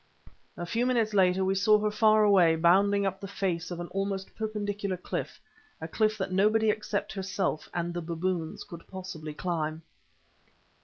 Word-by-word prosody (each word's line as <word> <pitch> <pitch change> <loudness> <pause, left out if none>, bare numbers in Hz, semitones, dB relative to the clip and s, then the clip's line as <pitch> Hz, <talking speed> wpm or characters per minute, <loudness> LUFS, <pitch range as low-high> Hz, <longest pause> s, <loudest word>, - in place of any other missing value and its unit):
A 175 - -4
few 235 +7 0
minutes 230 -4 +1
later 190 -1 +3
we 190 - +2
saw 210 +2 +4
her 210 0 0
far 215 0 +4
away, 185 -6 +5
bounding 195 +5 +3
up 190 0 -2
the 195 - -5
face 180 -3 -2
of 175 -1 -5
an 175 - -4
almost 195 0 -3
perpendicular 205 -3 -3
cliff—a 350 - -8
cliff 215 +4 +1
that 190 -2 -3
nobody 215 +3 +3
except 210 -1 -3
herself 190 -4 -2
and 175 0 -3
the 175 - -3
baboons 170 0 -3
could 170 -1 -11
possibly 180 -5 -7
climb. 160 -2 -3
195 Hz, 160 wpm, -28 LUFS, 175-210 Hz, -, away